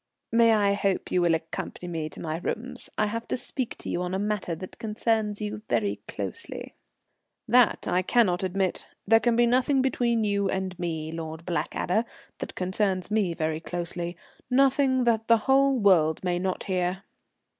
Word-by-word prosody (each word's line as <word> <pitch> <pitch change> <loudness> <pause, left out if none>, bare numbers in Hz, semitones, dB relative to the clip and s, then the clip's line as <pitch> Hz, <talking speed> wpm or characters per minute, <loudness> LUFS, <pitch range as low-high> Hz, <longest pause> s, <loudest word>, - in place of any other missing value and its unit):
"May 230 0 +5
I 200 -1 +3
hope 200 -1 -1
you 180 - +3
will 170 -1 +4
accompany 160 +2 -5
me 160 -3 -3
to - - -12
my 160 -1 -3
rooms? 250 +7 -4
I 215 - +3
have 230 +2 -4
to - - -1
speak 255 0 -3
to - - -8
you 175 - -1
on 180 +1 -2
a - - +1
matter 205 -4 -1
that 185 +3 -9
concerns 220 -1 -1
you 210 0 -4
very 205 -2 +1
closely." 460 - -6 0.7
"That 240 0 +4
I 180 +1 +2
cannot 185 -2 +2
admit. 190 0 -1 0.2
There 225 +2 +6
can 235 0 +2
be 240 +1 +5
nothing 260 +3 +3
between 235 -3 +1
you 200 -2 +1
and 190 -1 -2
me, 160 -3 -3
Lord 160 0 -6
Blackadder, 180 +4 0 0.3
that - - -6
concerns 185 0 -1
me 200 -6 +1
very 155 0 -1
closely; 175 0 -3 0.3
nothing 265 0 +3
that 225 -2 +1
the 230 - +6
whole 275 0 +4
world 175 -8 +3
may 175 -1 0
not 185 0 -2
hear." 185 0 -1
200 Hz, 175 wpm, -27 LUFS, 175-230 Hz, 0.7 s, There